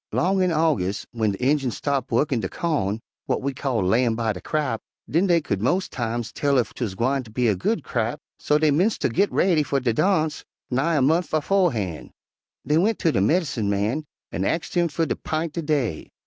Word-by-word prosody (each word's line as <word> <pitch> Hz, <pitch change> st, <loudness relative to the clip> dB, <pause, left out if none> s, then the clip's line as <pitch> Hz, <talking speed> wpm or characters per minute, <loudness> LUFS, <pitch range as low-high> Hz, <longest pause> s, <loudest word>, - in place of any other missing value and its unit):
'Long 190 Hz, +2 st, +1 dB
in 180 Hz, -1 st, +2 dB
Augus' 150 Hz, -, +1 dB
w'en 110 Hz, -3 st, 0 dB
de 95 Hz, -, -7 dB
Injuns 135 Hz, -4 st, +1 dB
stopped 140 Hz, -3 st, -1 dB
wu'kkin' 125 Hz, 0 st, +1 dB
de -, -, -3 dB
cawn, 115 Hz, -, -1 dB, 0.3 s
w'at -, -, 0 dB
we 140 Hz, 0 st, -1 dB
call 130 Hz, -5 st, -1 dB
'layin' 115 Hz, +5 st, +2 dB
by 110 Hz, -2 st, 0 dB
de 90 Hz, -, -9 dB
crap,' 135 Hz, -8 st, -1 dB, 0.3 s
den 170 Hz, +6 st, +2 dB
dey 170 Hz, -2 st, +4 dB
cu'd 100 Hz, -9 st, -2 dB
mos' 180 Hz, -, +1 dB
times 120 Hz, -1 st, -3 dB
tell 140 Hz, -1 st, +1 dB
ef 120 Hz, -, 0 dB
'twuz 110 Hz, -7 st, -4 dB
gwineter 130 Hz, +2 st, 0 dB
be 120 Hz, +2 st, +1 dB
a 105 Hz, -, +4 dB
good 155 Hz, -, -1 dB
crap, 120 Hz, +4 st, -2 dB, 0.2 s
so 150 Hz, -, +2 dB
dey 155 Hz, -1 st, +3 dB
'mence 185 Hz, +10 st, +2 dB
ter -, -, 0 dB
git 200 Hz, +2 st, +2 dB
raidy 175 Hz, -4 st, +3 dB
fer 140 Hz, -1 st, 0 dB
de 125 Hz, -3 st, 0 dB
darnse 155 Hz, -, +1 dB, 0.3 s
nigh 140 Hz, +7 st, +1 dB
a 140 Hz, -, +3 dB
month 165 Hz, +6 st, +2 dB
befo'han'. 150 Hz, -, 0 dB, 0.6 s
Dey 150 Hz, +2 st, +3 dB
went 215 Hz, +5 st, +2 dB
ter 165 Hz, -, +2 dB
de 95 Hz, -, +1 dB
medincin' 130 Hz, -, +1 dB
man 105 Hz, +9 st, 0 dB, 0.3 s
an' 85 Hz, +3 st, -2 dB
axed 165 Hz, -, -1 dB
him 175 Hz, -1 st, +2 dB
fer 165 Hz, +1 st, -1 dB
ter -, -, -1 dB
'pint 160 Hz, 0 st, -3 dB
de 170 Hz, -, -2 dB
day. 140 Hz, -, -1 dB
140 Hz, 210 wpm, -24 LUFS, 115-165 Hz, 0.6 s, dey